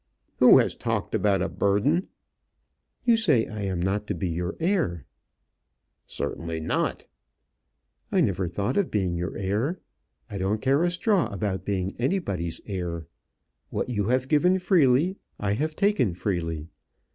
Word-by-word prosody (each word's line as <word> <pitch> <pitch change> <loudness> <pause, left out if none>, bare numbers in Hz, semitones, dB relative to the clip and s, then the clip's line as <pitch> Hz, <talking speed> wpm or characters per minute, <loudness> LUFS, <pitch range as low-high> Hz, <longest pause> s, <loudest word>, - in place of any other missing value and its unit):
"Who - - +8
has - - +3
talked - - -3
about 100 -3 +2
a - - 0
burden?" 110 - +1 1.0
"You 235 -2 +5
say 155 - +3
I 110 -1 -6
am 95 -3 -2
not 100 +4 -1
to - - -2
be 95 - -2
your 90 +2 -3
heir?" 165 - 0 1.0
"Certainly 80 +2 -3
not." 80 - -1 1.1
"I - - +3
never 95 -1 +1
thought 100 - -2
of 200 -3 +2
being 95 -4 0
your 85 +2 -3
heir. 105 - -1 0.5
I 100 - -6
don't 100 +3 0
care 135 +5 +2
a 175 - +3
straw 185 +2 +2
about 100 -1 -3
being 95 -1 -2
anybody's 100 - -1
heir. 85 -5 -4 0.6
What - - -2
you 105 -4 0
have 130 +3 +1
given 180 +6 +3
freely, 175 -1 +3 0.2
I 100 -1 0
have 155 +8 -2
taken 195 - +2
freely. 85 -5 -2
105 Hz, 145 wpm, -26 LUFS, -, 1.1 s, Who